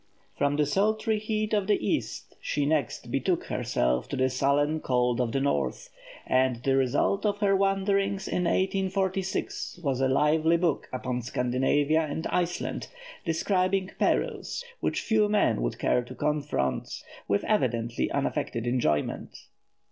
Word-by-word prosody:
From 145 0 +1
the 150 0 +2
sultry 215 - +1
heat 215 0 -2
of 205 -2 +1
the 210 - +4
East 105 - -3
she 145 -1 -1
next 145 -4 -1
betook - - 0
herself 60 +1 0
to - - -3
the 130 0 +1
sullen 145 +4 +1
cold 125 -3 +1
of 120 -2 -1
the 135 - 0
North; 70 - -1 0.3
and 130 -1 +2
the 135 -1 +2
result 135 +9 +1
of 205 -1 +1
her 200 -1 +2
wanderings 195 0 +1
in 180 - -1
1846 190 -1 -1
was 135 -3 0
a 135 - +3
lively 155 +5 +3
book 170 -3 0
upon 125 -1 -3
Scandinavia 130 +6 +1
and 155 +1 -3
Iceland, 175 -1 -1 0.4
describing 185 +3 +1
perils - - 0
which - - -1
few 215 -2 +2
men 210 - +2
would - - -2
care 125 - +2
to 130 - -10
confront, 145 - -2 0.2
with 100 - +1
evidently 120 - 0
unaffected 115 0 -2
enjoyment. 120 - -1
150 Hz, 140 wpm, -27 LUFS, 130-195 Hz, 0.4 s, the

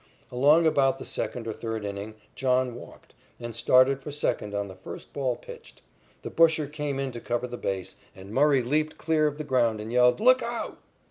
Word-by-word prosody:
Along 145 +7 +4
about 135 -4 +3
the - - -8
second 120 -2 -3
or 110 - -2
third 110 -2 -5
inning 100 +2 -6 0.2
John 130 -1 +1
walked, 120 - -13 0.3
and 120 -1 -6
started 130 +2 +4
for 145 - -7
second 105 -7 -2
on 100 0 -2
the 95 - -9
first 95 0 -10
ball 130 -3 -1
pitched. 475 -1 -13 0.4
The - - -6
busher 160 -2 +4
came 145 -1 -4
in 135 -1 -2
to 120 - -7
cover 120 +1 -2
the 125 0 -6
base, 95 -5 -4 0.2
and 95 +2 -11
Murray 140 0 +4
leaped 155 +5 0
clear 155 -1 +2
of 145 -1 -3
the 155 - -4
ground 120 -6 +1
and 110 +2 -6
yelled: 125 +4 +4
"Look 255 +3 +5
out!" 235 0 -5
130 Hz, 200 wpm, -27 LUFS, 115-150 Hz, 0.4 s, Look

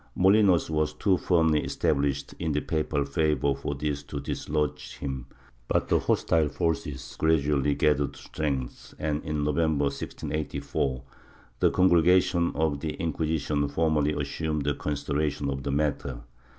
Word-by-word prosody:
Molinos 95 -2 +5
was 75 -1 0
too 95 +4 +2
firmly 80 -4 +2
established 70 -1 0
in 80 -3 -1
the 75 - +2
papal 75 -2 -1
favor 70 -1 +1
for 70 +1 -4
this 70 0 -2
to 70 0 -6
dislodge 75 +1 -3
him, 65 -3 -5 0.4
but - - 0
the - - +4
hostile 80 -2 +2
forces 75 -4 -3
gradually 75 -3 +2
gathered 70 -2 +1
strength 70 -5 -4
and, 75 -1 -2
in 75 -1 -2
November, 75 0 +1
1684, 70 -2 -3 0.6
the - - +4
Congregation 90 -1 +4
of 75 -2 0
the 75 0 -3
Inquisition 80 -2 -1
formally 75 0 +1
assumed 75 +1 -2
considera 75 +1 -1
tion 70 0 -3
of 65 0 -3
the 70 - -2
matter. 70 -3 -1
75 Hz, 135 wpm, -27 LUFS, 70-80 Hz, 0.6 s, Molinos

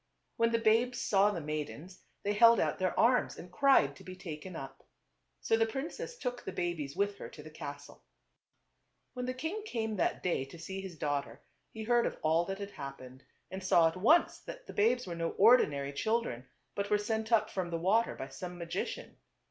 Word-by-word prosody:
When 230 0 +3
the 230 - +3
babes 230 +2 +2
saw 200 0 +3
the 185 -5 -3
maidens 155 +4 -5 0.2
they 205 - 0
held 230 +2 +7
out - - 0
their 185 -1 0
arms 250 +2 +3
and 175 - -10
cried 180 - +4
to - - -14
be 185 - -8
taken 180 -1 -8
up. 135 -2 -8 0.6
So - - +2
the 225 0 +2
princess 280 - -5
took 245 - -4
the - - -4
babies 170 -6 -3
with 200 0 0
her - - -7
to 150 - -12
the 155 - -11
castle. 145 -2 -9 1.1
When 250 0 -4
the 255 - -2
king 325 +11 -3
came 220 - -3
that - - 0
day 175 -7 0
to 135 +5 -12
see 190 +4 -6
his 185 -4 -8
daugh 145 -2 -1
ter - - -14 0.3
he 220 - -6
heard 240 +1 +3
of - - -5
all 160 +2 +3
that 195 +2 -4
had 200 0 -6
happened, 130 -3 -9 0.3
and 190 0 -6
saw 170 -3 +5
at 160 - -9
once 265 - +4
that - - -10
the - - -9
babes 240 +4 +2
were 175 - -5
no 165 0 -2
ordinary 150 - +4
children, 140 - -1 0.3
but 200 0 -3
were 210 - +4
sent 220 +2 -2
up 215 -1 +3
from 185 -2 -2
the 165 - -2
water 195 +7 +2
by 135 - -6
some 175 +6 -7
magi 170 -1 -2
cian. - - -8
190 Hz, 210 wpm, -32 LUFS, 160-230 Hz, 1.1 s, held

